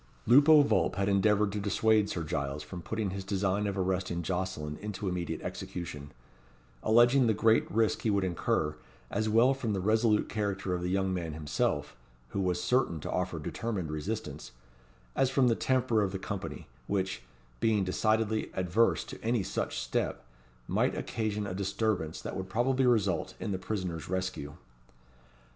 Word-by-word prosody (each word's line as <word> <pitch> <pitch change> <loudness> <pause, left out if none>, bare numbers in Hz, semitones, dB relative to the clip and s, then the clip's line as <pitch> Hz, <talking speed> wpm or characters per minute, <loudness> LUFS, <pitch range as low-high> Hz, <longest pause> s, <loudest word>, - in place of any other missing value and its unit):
Lupo 145 +5 +7
Vulp 100 -11 +1
had 100 +1 0
endeavoured 105 +1 +3
to 105 - -3
dissuade 105 +1 +2
Sir 85 - -3
Giles 70 -1 -3
from 90 -2 -8
putting 110 0 -2
his 95 0 -5
design 100 +1 0
of 100 -1 -3
arresting 90 -2 -1
Jocelyn 90 -4 -3
into 105 -1 -4
immediate 90 -2 -3
execution; 75 -5 -6 0.7
alleging 120 +3 +5
the 110 - +3
great 110 +1 +3
risk 110 +1 +1
he 110 - 0
would 100 -2 +2
incur, 80 -4 0 0.4
as 110 0 0
well 115 +5 +5
from 120 -5 -2
the 95 - -1
resolute 110 +2 +2
character 100 -3 -2
of 90 - -2
the 90 - -2
young 95 0 +1
man 85 -3 -3
himself, 75 -1 -1 0.3
who 100 - -2
was 90 -2 0
certain 105 -6 +1
to - - -4
offer 90 -1 -1
determined 90 +1 -3
resistance, 75 -2 -5 0.6
as 135 -1 +3
from 130 -1 +3
the 115 - +3
temper 125 -4 +2
of 100 -2 0
the 95 - -3
company, 95 0 -6 0.2
which, 95 -8 -1 0.4
being 110 -3 +2
decidedly 110 +3 +1
adverse 95 +5 +2
to - - -10
any 115 -2 +1
such - - -3
step, - - -2 0.4
might - - +1
occasion 105 -2 -2
a 95 - -4
disturbance 95 -3 -1
that - - -5
would 95 0 -5
probably 130 +4 +2
result 100 -8 +1
in - - -3
the 95 - -2
prisoner's 90 -6 -4
rescue. 90 -6 -3
100 Hz, 165 wpm, -30 LUFS, 90-110 Hz, 0.7 s, Lupo